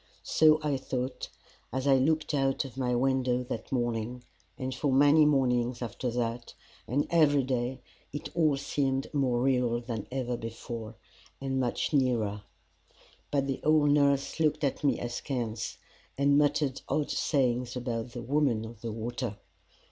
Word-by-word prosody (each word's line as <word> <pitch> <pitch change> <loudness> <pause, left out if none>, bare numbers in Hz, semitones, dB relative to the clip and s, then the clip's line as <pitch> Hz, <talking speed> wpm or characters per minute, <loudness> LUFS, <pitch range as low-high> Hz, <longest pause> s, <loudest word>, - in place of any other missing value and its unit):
So 155 -1 +5
I 145 -2 +1
thought, 130 0 -4 0.4
as 130 +1 -2
I 135 -1 +5
looked 155 +4 +1
out 135 -1 +1
of 130 - -9
my 125 -2 0
window 125 -1 +1
that 120 -3 -6
morning 120 -1 -2 0.3
and 130 0 -3
for 140 +3 -1
many 145 +3 +6
mornings 125 -4 +2
after 120 +2 -3
that, 120 0 -3 0.3
and 140 +5 +1
every 145 -4 +4
day 125 0 -2 0.3
it 145 - -5
all 155 -5 +3
seemed 135 -1 -1
more 125 -4 +1
real 125 -3 +2
than 115 -3 -5
ever 125 -2 -2
before, 115 0 -7 0.4
and 135 -1 -2
much 125 +4 -1
nearer. 115 -7 +1 0.9
But 140 -1 +1
the 135 -1 -3
old 150 -1 +4
nurse 140 0 +2
looked 155 -1 +1
at 140 0 -1
me 145 - +2
askance, 120 -2 -3 0.4
and 140 +1 +4
muttered 145 -2 +2
odd 150 -1 0
sayings 125 -4 0
about 120 -1 -3
the 120 - -6
Woman 130 -4 +1
of 115 -1 -11
the 115 - -4
Water. 115 0 -4
130 Hz, 150 wpm, -29 LUFS, 120-140 Hz, 0.9 s, many